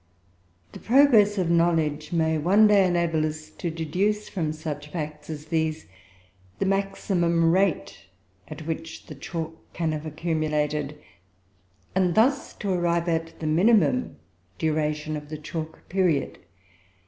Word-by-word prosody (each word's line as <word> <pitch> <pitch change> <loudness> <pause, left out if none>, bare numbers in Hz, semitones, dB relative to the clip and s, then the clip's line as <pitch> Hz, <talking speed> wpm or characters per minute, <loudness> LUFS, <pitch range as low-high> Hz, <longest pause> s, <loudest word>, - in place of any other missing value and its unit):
] 90 -1 -38
The - - -10
progress 225 -5 +5
of 175 -3 +1
knowledge 160 -3 +1
may, 160 -2 +1
one 195 +8 +5
day, 205 -3 +5
enable 170 -3 +1
us 155 0 -4
to 170 - -4
deduce 180 +7 -1
from 160 -5 -2
such 155 -2 -6
facts 150 -1 -6
as 150 -1 -6
these 160 -1 -1 0.7
the - - -1
maximum 180 -4 +1
rate 185 - 0 0.4
at 155 - -8
which 160 0 -5
the - - -9
chalk 160 +3 -5 0.2
can 165 -2 -1
have 155 0 -4
accumulated, 150 -2 -1 1.0
and 180 -2 +2
thus 265 +5 +2
to 200 - -3
arrive 170 -1 0
at 165 -1 -2
the 160 - -5
minimum 215 +10 +3 0.4
duration 155 -1 -1
of 150 -1 -7
the 155 - -5
chalk 155 +1 -7
period. 180 -7 0
160 Hz, 135 wpm, -25 LUFS, 155-180 Hz, 1.0 s, progress